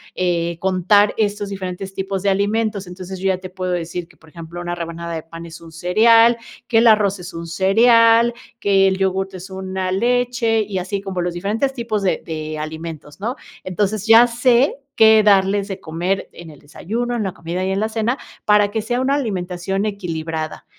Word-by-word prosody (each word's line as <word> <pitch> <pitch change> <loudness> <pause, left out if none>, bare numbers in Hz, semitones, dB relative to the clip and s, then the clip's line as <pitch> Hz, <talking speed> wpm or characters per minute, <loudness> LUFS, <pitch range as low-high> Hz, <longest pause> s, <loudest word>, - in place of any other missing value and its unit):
eh, 170 -2 -1
contar 190 +3 +3
estos 205 -1 -1
diferentes 190 0 -6
tipos 195 0 -3
de 200 - +2
alimentos, 205 0 0
entonces 185 +1 -8
yo 195 - -1
ya 190 -1 +2
te 185 0 -9
puedo 185 0 -4
decir 175 0 -3
que, 165 -3 -23
por 160 +1 -20
ejemplo, 170 +2 -9
una 175 0 -3
rebanada 170 0 -6
de 160 -1 -4
pan 165 +1 -10
es 165 0 -11
un 165 - -13
cereal, 225 +8 +4 0.3
que 230 - +2
el 235 - +5
arroz 205 -3 +4
es 180 +1 -9
un 165 0 -6
cereal, 230 +6 +4 0.3
que 195 -2 +3
el 190 - +1
yogur 190 0 0
es 185 +1 -9
una 190 0 -4
leche 235 +1 +1
y 200 -2 -4
así 195 +2 -3
como 190 -2 -4
los 175 0 -2
diferentes 215 +10 -1
tipos 230 -4 -2
de 190 - 0
de 155 -1 -5
alimentos, 155 0 -7
¿no? 230 +6 -3 0.3
Entonces 200 +2 -2
ya 225 +2 +8
sé 245 +3 +2 0.2
qué 220 -1 +7
darles 200 0 +3
de 195 -2 -6
comer 175 +4 -2
en 170 -1 -11
el 150 - -14
desayuno, 230 +11 -4
en 225 - -1
la 190 - -3
comida 175 +2 -4
y 190 - -1
en 190 - 0
la 220 - 0
cena 225 +3 -1 0.3
para 210 -1 +4
que 220 - -1
sea 245 +3 -1
una 270 +2 +1
alimentación 190 -5 -2
equilibrada. 165 -6 -4
190 Hz, 195 wpm, -20 LUFS, 175-215 Hz, 0.3 s, ya